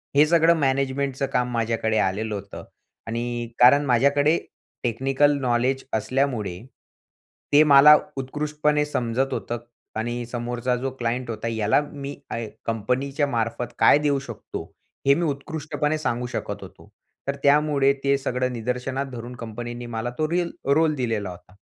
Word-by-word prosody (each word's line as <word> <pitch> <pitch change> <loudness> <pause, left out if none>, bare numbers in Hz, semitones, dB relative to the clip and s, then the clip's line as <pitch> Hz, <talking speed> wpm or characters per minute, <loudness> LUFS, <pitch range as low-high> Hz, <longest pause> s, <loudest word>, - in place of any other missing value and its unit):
हे 145 - +7
सगळं 165 0 +5
मॅनेजमेंटचं 135 0 0
काम 125 0 +1
माझ्याकडे 115 -1 0
आलेलं 105 +2 0
होतं 100 0 -8 0.4
आणि 120 +1 -3
कारण 140 +4 +7
माझ्याकडे 140 +5 +3 0.5
टेक्निकल 135 +4 +2
नॉलेज 125 +2 +1
असल्यामुळे 110 -5 -1 0.9
ते 150 +2 +8
मला 150 +1 +8 0.2
उत्कृष्टपणे 150 +2 0
समजत 130 -1 -1
होतं 120 - -3 0.4
आणि 120 +2 -3
समोरचा 120 +1 -2
जो 130 +2 -2
क्लायंट 120 +1 -2
होता 110 0 -4
याला 110 +3 +2
मी 140 0 -6 0.2
आय 115 -2 -3 0.2
कंपनीच्या 130 +6 -1
मार्फत 120 0 -2
काय - - +7
देऊ 145 -2 +1
शकतो, 120 -5 -7 0.4
हे 140 - +8
मी 170 - 0
उत्कृष्टपणे 150 +1 -2
सांगू 125 -5 -2
शकत - - -5
होतो. - - -14 0.4
तर 140 - 0
त्यामुळे 145 -1 +4
ते 140 0 +3
सगळं 125 -1 -1
निदर्शनात 125 +3 -2
धरून 120 +1 -7
कंपनीनी 120 +1 -6
मला 120 0 -3
तो 155 0 0
रील 175 0 0
तो 140 - -1
रोल 160 -1 +3
दिलेला 110 -7 -2
होता. 90 +1 -12
125 Hz, 140 wpm, -24 LUFS, 115-140 Hz, 0.9 s, ते